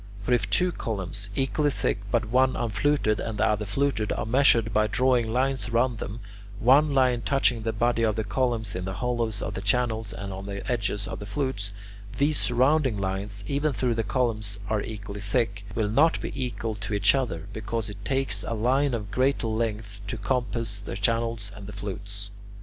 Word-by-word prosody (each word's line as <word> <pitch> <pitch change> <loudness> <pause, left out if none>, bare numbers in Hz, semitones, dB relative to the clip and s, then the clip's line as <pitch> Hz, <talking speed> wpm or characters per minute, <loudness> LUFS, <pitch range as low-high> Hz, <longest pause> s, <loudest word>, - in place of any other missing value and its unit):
For 115 +5 0
if 120 - +1
two 180 0 +3
columns, 100 - -4
equally 140 +4 +1
thick 130 - -1
but 115 +2 +1
one 130 +3 +3
unfluted 120 0 +1
and 110 -2 -3
the - - +3
other 105 0 0
fluted, 110 -1 0
are - - -1
measured 115 -2 +4
by 110 0 +3
drawing 120 +2 +2
lines 130 +1 +1
round 120 0 +1
them, 110 +3 -5 0.4
one 140 +4 +5
line 125 -3 +3
touching 125 0 +2
the 115 0 -1
body 115 +2 +1
of 110 -2 +2
the 110 - -1
columns 110 0 0
in 90 0 -3
the 95 0 -4
hollows 120 -4 -1
of - - -3
the 95 - -4
channels 110 0 0
and 100 0 -5
on 95 +1 -7
the 100 0 -5
edges 105 -2 -1
of - - -5
the 100 - -7
flutes, 105 -5 -2 0.5
these 145 +2 +3
surrounding 130 0 +3
lines, 100 +1 -3
even 145 +1 0
though 125 -2 +1
the 115 - 0
columns 110 -2 0
are 110 -1 +2
equally 105 -1 -6
thick, 100 -1 -1
will 110 -2 +1
not 145 +10 +3
be - - -4
equal 120 -4 -3
to 105 0 -4
each 100 0 +5
other, 120 -12 -1
because 110 0 -3
it 100 -1 -9
takes 130 -6 +1
a 115 - -2
line 130 +4 +2
of 105 -3 -5
greater 130 +2 +1
length 110 -2 -2
to 120 - -3
compass 115 -1 -1
the 100 - -6
channels 115 -1 0
and 100 -1 -9
the 105 - -8
flutes. 100 0 -5
115 Hz, 195 wpm, -26 LUFS, 105-125 Hz, 0.5 s, one